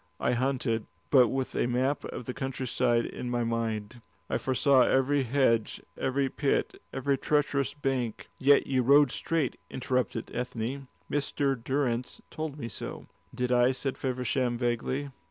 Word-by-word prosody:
I - - +1
hunted, 125 -3 0 0.2
but 130 -4 +7
with 130 +1 -2
a - - +1
map 130 +3 0
of 125 - -6
the 125 - -4
country 135 -1 -4
side 120 -1 +2
in 125 - -5
my 120 -1 0
mind. 115 0 -2 0.3
I - - +1
foresaw 135 +1 +3
every 135 +3 +3
hedge, 120 -3 +1 0.2
every 135 +1 0
pit, 140 +1 -1
every 135 0 0
treacherous 145 -2 +1
bank." 135 -5 -2
"Yet 140 +1 +5
you 130 -2 +1
rode 140 +1 +6
straight," 160 -6 -1
interrupted 125 -3 -2
Ethne. 125 +2 -3 0.2
"Mr. 140 -1 0
Durrance 125 -1 -2
told 155 -2 -4
me 115 - -5
so." - - -7 0.3
"Did 125 0 -1
I?" 125 +1 +4
said 130 +1 -3
Feversham, 125 -1 -1
vaguely. 125 +4 -1
130 Hz, 150 wpm, -29 LUFS, 120-140 Hz, 0.3 s, but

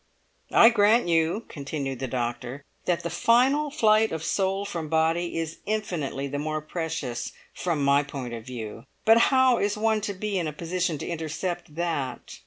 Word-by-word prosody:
"I 230 - +8
grant 220 -1 +4
you," 165 +6 +1
continued 140 -2 -4
the 130 - -2
doctor, 125 +2 -4 0.2
"that 175 -1 0
the 170 - -3
final 260 - +3
flight 220 -5 +3
of 160 -1 -4
soul 195 +3 0
from 170 -6 -4
body 165 +2 +1
is 165 -1 -4
infinitely 175 -11 -2
the 145 +1 -3
more 155 +1 -2
precious 155 -5 -4 0.2
from 165 -5 -1
my 140 +1 +5
point 135 -4 -6
of 115 -1 -6
view. 115 -3 -7 0.2
But 225 +1 +7
how 260 -2 +4
is 205 +1 0
one 220 0 +1
to 200 -1 -3
be 200 0 -2
in 170 - -1
a 155 - -4
position 170 +1 -2
to - - -6
intercept 170 0 -4
that? 160 -7 -3
165 Hz, 175 wpm, -26 LUFS, 145-205 Hz, 0.2 s, I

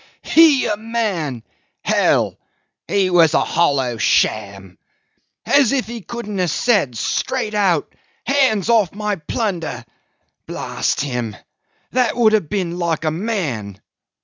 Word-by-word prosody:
"He 315 -5 +5
a 210 -2 -1
man! 205 - -3 0.4
Hell! - - +1 0.5
He 195 -2 +1
was 165 -3 +4
a - - +4
hollow 135 -7 +1
sham. 100 -3 0 0.7
As 280 -5 +4
if 265 -2 0
he 235 0 -7
couldn't 210 -2 -6
have 180 -2 +1
said 180 - +1
straight 210 - -2
out, 190 -7 +1 0.3
'Hands 255 -7 +2
off 220 -6 +2
my 210 -1 -2
plunder!' 175 0 -3 0.6
blast - - -2
him! 125 -6 -3 0.6
That 250 -1 +1
would 220 -3 +4
have 205 -9 +1
been 180 -3 -2
like 165 -2 -1
a 155 - +1
man! 155 - -3
190 Hz, 125 wpm, -19 LUFS, 145-225 Hz, 0.7 s, He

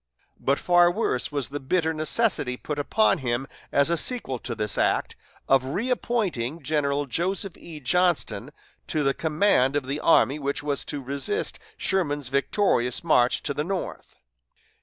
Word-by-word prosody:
But 140 +1 +1
far 175 -1 +4
worse 175 - -1
was 140 -4 -2
the 145 +1 -5
bitter 160 +4 0
necessity 155 - 0
put 150 +2 -5
upon 215 +7 +2
him 125 0 -1 0.3
as 140 +3 +3
a 170 - +2
sequel 160 - +1
to 120 0 -5
this 105 -2 -2
act, - - 0 0.3
of 135 -1 +4
reappointing 180 - -2
General 145 0 0
Joseph 185 - -1
E. 160 -3 -10
Johnston 175 +4 +1 0.4
to 155 - 0
the 135 0 +2
command 150 -4 +2
of 145 -2 0
the 140 +3 -3
army 145 -3 +3
which 140 +2 -2
was 145 -1 0
to 145 -2 -5
resist 140 - -2 0.2
Sherman's 145 -8 0
victorious 140 - +1
march 125 -7 +3
to 145 - -2
the 150 - -2
north. 185 +2 -5
145 Hz, 155 wpm, -25 LUFS, 135-175 Hz, 0.4 s, far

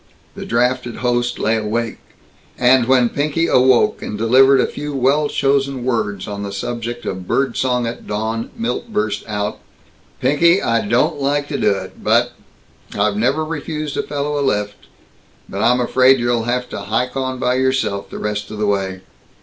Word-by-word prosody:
The - - -8
drafted 125 0 0
host 120 0 0
lay 110 +1 +1
awake, 110 +1 -2 0.6
and 125 -1 +4
when 130 -2 +4
Pinky 150 +5 0
awoke 130 -5 +3
and 105 - -5
delivered 130 +5 +5
a - - +3
few 145 0 -5
well 140 +3 +2
chosen 135 -2 0
words 105 -6 -1
on 100 -1 -5
the 100 -1 -4
subject 120 +4 -5
of 95 -1 -5
bird 135 -3 0
song 125 -2 0
at 115 - -6
dawn, 110 +2 -3
Milt 230 0 -3
burst 210 0 -1
out: 105 -1 -3 0.6
"Pinky, 170 +7 +4
I 115 - 0
don't 120 +5 +1
like 145 +1 0
to - - -2
do - - +3
it, 95 -2 -4
but - - +3 0.7
I've 100 0 +1
never 135 +9 +1
refused 155 -2 -4
a - - 0
fellow 145 0 -3
a - - 0
lift, 105 -6 -2 0.6
but 100 - -5
I'm 125 +2 +3
afraid 130 +2 +4
you'll 120 -1 0
have 125 +1 -1
to - - -5
hike 115 +6 -2
on 130 -1 -2
by 125 0 +1
yourself, 130 -6 0
the - - -7
rest 105 -1 -3
of 110 - -7
the 105 - 0
way." 95 -2 -1
125 Hz, 175 wpm, -19 LUFS, 110-135 Hz, 0.7 s, delivered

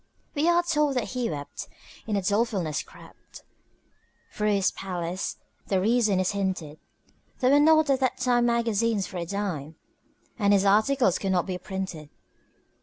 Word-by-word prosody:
We 310 +3 +2
are 345 0 +4
told 300 -5 +1
that 250 - -1
he 250 -2 -2
wept, 145 -2 -6 0.4
and 210 -2 0
in 195 - -2
dolefulness 200 -6 0
crept - - -15 0.9
Through 210 0 +1
his 195 -2 +2
palace 180 -1 -4 0.3
the 190 - +1
reason 215 -1 +2
is 185 - +1
hinted: 185 -7 -3 0.6
There 255 0 +2
were 285 - +6
not 315 +1 +5
at 265 - +2
that 260 -2 0
time 245 -1 +2
magazines 230 -3 +1
for 185 - -8
a 170 -1 -4
dime, 170 -6 -4 0.6
And 205 -1 +3
his 200 0 +3
articles 215 0 +3
could 195 - -1
not 180 -2 +1
be 185 -2 -4
printed. 185 -5 -6
205 Hz, 160 wpm, -26 LUFS, 185-245 Hz, 0.9 s, were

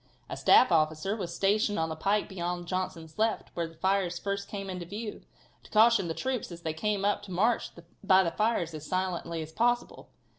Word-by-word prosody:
A - - -2
staff 255 - +5
officer 160 +4 +2
was 185 -6 -4
stationed 205 +2 +2
on 160 0 0
the 160 - -4
pike 200 +6 +1
beyond 175 -2 -4
Johnson's 180 -2 -4
left, 220 0 0
where 170 -1 -2
the 165 - -15
fires 185 0 0
first 200 +1 -3
came 195 -1 -6
into 180 -2 -5
view, 210 +5 -6 0.4
to - - -17
caution 220 -3 +5
the 165 - -3
troops 260 -7 -3
as 170 0 -9
they 160 - -2
came 200 +4 -1
up 205 - +1
to 195 - -11
march 220 +7 +1 0.3
by 190 -1 +5
the 170 - -1
fires 210 -6 0
as 155 -2 -7
silently 180 -3 -2
as 155 - -10
possible. 240 +6 0
190 Hz, 200 wpm, -29 LUFS, 170-210 Hz, 0.4 s, staff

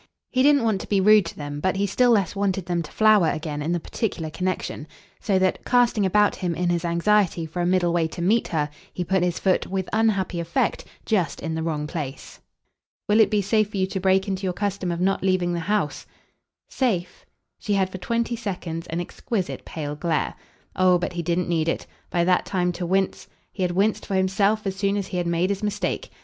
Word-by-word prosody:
He 255 - +2
didn't 285 -1 +5
want 215 -4 +1
to - - -8
be 200 - +3
rude 210 -1 +5
to - - -8
them, 145 -1 -5
but 185 +5 0
he 200 +1 +1
still 245 +5 +2
less 205 -5 +2
wanted 195 -2 -1
them 175 -1 -1
to 155 - -9
flower 215 -6 +4
again 150 -1 -3
in 155 +3 -1
the 175 - +1
particular 165 -4 -3
connexion; 180 -4 -3 0.3
so 200 -3 +1
that, 185 0 +1
casting 240 -5 +3
about 205 +2 +3
him 175 -3 -2
in 175 +1 0
his 175 0 0
anxiety 175 0 +2
for 165 +3 -4
a 175 - +1
middle 180 -2 +2
way 170 -2 +2
to 160 - -9
meet 220 +6 +2
her, 150 -3 -1 0.2
he 180 - -3
put 190 +1 +1
his 175 -1 0
foot, 190 -2 +1
with 190 -1 -2
unhappy 205 -5 +1
effect, 170 - -1 0.2
just 185 -10 0
in 160 - -4
the 160 - -2
wrong 155 -2 -2
place. 150 -4 -6 0.7
"Will 210 +1 +4
it 220 - +6
be 210 -1 +1
safe 215 +1 +2
for 210 - -5
you 190 - +2
to 190 +1 -4
break 190 +1 +2
into 190 -1 -2
your 185 -2 -1
custom 195 -2 -2
of 170 - -3
not 195 +1 +1
leaving 185 -2 +1
the 170 - -1
house?" 200 -3 -1 0.6
"'Safe' 220 - -1 0.2
?" - - -56
She 210 - -2
had 190 -1 +1
for 185 - -6
twenty 235 +5 -1
seconds 180 -7 -5
an 165 - -3
exquisite 190 +3 -4
pale 150 -2 -5
glare. 165 +2 -1 0.4
Oh 185 -1 +4
but 175 0 -3
he 175 - -2
didn't 170 +2 0
need 165 -2 +1
it, - - -2 0.2
by 175 - +1
that 180 +1 +2
time, 180 -2 0
to 175 0 -4
wince; 190 +1 0 0.2
he 195 - -7
had 180 -1 +1
winced 200 +4 +1
for 195 - -1
himself 195 +3 +1
as 195 -1 -2
soon 200 +1 0
as 200 - -2
he 185 - -3
had 175 -1 -1
made 170 +3 +1
his 200 0 -3
mistake. 210 - -2
185 Hz, 225 wpm, -24 LUFS, 170-205 Hz, 0.7 s, it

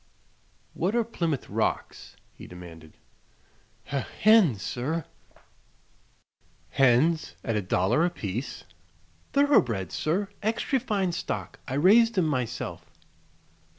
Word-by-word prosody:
"What 190 +6 -1
are 235 - +3
Plymouth 170 - -3
Rocks?" - - -3 0.2
he - - -12
demanded. 85 -3 -12 0.9
"He 140 - -4 0.2
hens, 195 - +5
sir." 150 +6 -3 1.6
"Hens 135 +6 +2
at 115 - -1
a 105 - +1
dollar 95 - +1
apiece?" 125 - -3 0.7
"Thoroughbreds, 125 - +2
sir. 190 +6 -1
Extry 225 +5 0
fine 205 -7 -1
stock. - - -5
I 130 - -3
raised 220 +9 +5
'em 180 - +3
myself." 130 -7 -3
155 Hz, 100 wpm, -27 LUFS, -, 1.6 s, hens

